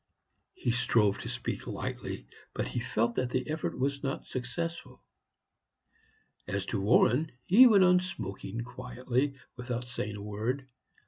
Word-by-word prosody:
He 120 - 0
strove 115 -4 +3
to - - -5
speak - - -4
lightly, - - -4 0.3
but - - -1
he - - -2
felt 120 -1 0
that 130 -1 +1
the 125 0 -1
effort 155 +1 -2
was 140 +1 0
not 135 -2 -3
successful. 165 +7 -4 1.4
As 100 0 -2
to - - 0
Warren, 125 +8 +4
he 240 +8 +9
went 205 -5 +6
on 180 0 +6
smoking 110 - -5
quietly, 125 +3 -2 0.2
without 125 -1 -4
saying 110 -3 -4
a 100 - -7
word. 115 +6 -2
125 Hz, 140 wpm, -30 LUFS, 115-140 Hz, 1.4 s, he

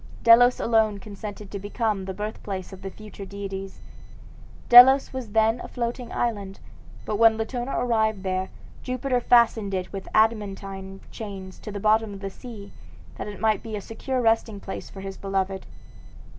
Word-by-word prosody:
Delos 245 +2 +7
alone 220 -2 +2
consented 205 0 -9
to 200 - -5
become 205 -1 -2
the 190 - -4
birthplace 200 -2 -5
of 190 - -11
the 195 - -5
future 210 0 -11
deities. 195 0 -7 0.9
Delos 265 +3 +8
was 245 -6 -6
then 225 +1 +3
a - - -7
floating 240 0 -4
island; 200 -5 -2 0.5
but 210 - -2
when 225 0 +5
Latona 240 +3 -3
arrived 220 -4 +1
there, 185 0 -2 0.3
Jupiter 255 0 -1
fastened 225 -5 +3
it 185 +1 -4
with 195 -1 -6
adamantine 195 -3 0
chains 195 -4 -8
to 210 - -8
the 205 - -5
bottom 215 0 +2
of - - -9
the 195 -1 -5
sea, 210 -3 -10 0.5
that - - -4
it 205 -2 -8
might 215 -1 +2
be 220 -2 -6
a - - -3
secure 255 +5 -3
resting 225 -2 +1
place 195 - -7
for 195 - -10
his 195 0 -7
beloved. 195 -1 -2
210 Hz, 165 wpm, -25 LUFS, 195-230 Hz, 0.9 s, Delos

